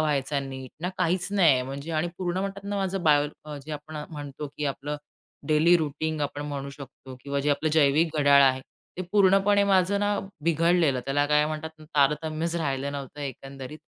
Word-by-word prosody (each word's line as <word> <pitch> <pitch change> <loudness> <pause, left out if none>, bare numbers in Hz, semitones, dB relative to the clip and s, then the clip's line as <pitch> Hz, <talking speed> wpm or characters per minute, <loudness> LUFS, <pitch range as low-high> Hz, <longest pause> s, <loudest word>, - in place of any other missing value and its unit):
व्हायचा 145 -2 0
नीट, 130 -1 -7
ना 180 - -1
काहीच 180 0 +1
नाहीये 160 -11 +4
म्हणजे 140 +5 -6
आणि 155 +2 0
पूर्ण 180 -1 -1
म्हणतात 195 0 -4
ना 200 0 -3
माझं 195 -1 -1
बायोलॉजी 150 0 0
आपण 150 +1 -7
म्हणतो 145 -1 -6
की 150 - -3
आपलं 145 +2 -3 0.5
डेली 160 +3 +5
रूटीन 155 0 -2
आपण 145 0 -3
म्हणू 140 -1 -5
शकतो 135 -2 -11
किंवा 140 +1 -2
जे 145 - +1
आपलं 155 +2 0
जैविक 155 +1 +4
घड्याळ 140 -1 +6
आहे, 130 -1 +4 0.4
ते 185 - -3
पूर्णपणे 200 0 +4
माझं 195 0 +3
ना 205 0 +1 0.3
बिघडलेलं, 165 -4 +3
त्याला 145 +1 +1
काय 150 0 +3
म्हणतात 155 +1 -6 0.2
तारतम्यच 155 +3 +1
राहिलं 140 -3 -2
नव्हतं 140 +1 -7
एकंदरीत. 135 +1 -7
150 Hz, 170 wpm, -26 LUFS, 140-170 Hz, 0.5 s, घड्याळ